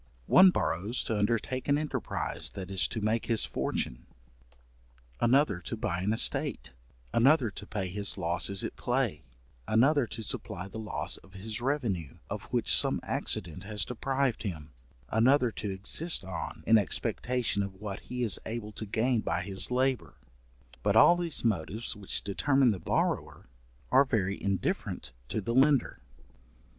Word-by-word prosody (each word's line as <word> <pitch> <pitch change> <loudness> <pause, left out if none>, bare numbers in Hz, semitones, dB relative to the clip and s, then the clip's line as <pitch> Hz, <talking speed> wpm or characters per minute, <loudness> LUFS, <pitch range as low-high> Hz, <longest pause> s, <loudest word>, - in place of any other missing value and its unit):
One 185 - +8
borrows 105 - -1
to 110 - -2
undertake 115 +4 -1
an 145 0 +3
enterprize 150 0 -3
that 95 -1 -7
is 95 -2 +2
to 110 - -4
make 110 +2 0
his 115 -2 +3
fortune, - - -3 1.1
another 120 -5 +3
to 85 - -6
buy 85 +1 -2
an 100 +3 0
estate, 60 - -1 0.4
another 130 -1 +4
to 100 - -9
pay 100 -3 -3
his 100 +2 0
losses 90 +3 +1
at - - -4
play, 120 - -1 0.5
another 130 +4 +3
to 110 +1 -6
supply 95 -2 -5
the 105 +3 -8
loss 110 -2 -3
of 95 - -19
his 110 +4 -5
revenue, 120 - -2
of - - -4
which - - +2
some - - +3
accident 90 +2 -3
has 105 -2 -1
deprived 130 -1 -1
him, 80 -8 -5 0.4
another 125 +2 +4
to 105 - -5
exist 100 - +2
on, 95 -2 -6
in 115 -1 +6
expectation 120 +2 -1
of 100 -1 -4
what 100 0 -6
he 125 0 -4
is 110 - +3
able 110 -1 -5
to 110 +1 -5
gain 115 +4 +1
by 90 - -1
his 95 -1 0
labour; 130 +1 0 0.7
but 100 0 +1
all 170 +10 +8
these 170 -7 -3
motives 110 +2 0
which 100 -2 -4
determine 135 +5 +2
the 100 - -3
borrower, - - -1 0.5
are 135 +2 +6
very 100 -6 -1
indifferent 100 -2 -2 0.2
to - - -1
the 115 - -2
lender. 135 - +3
110 Hz, 155 wpm, -30 LUFS, 95-125 Hz, 1.1 s, One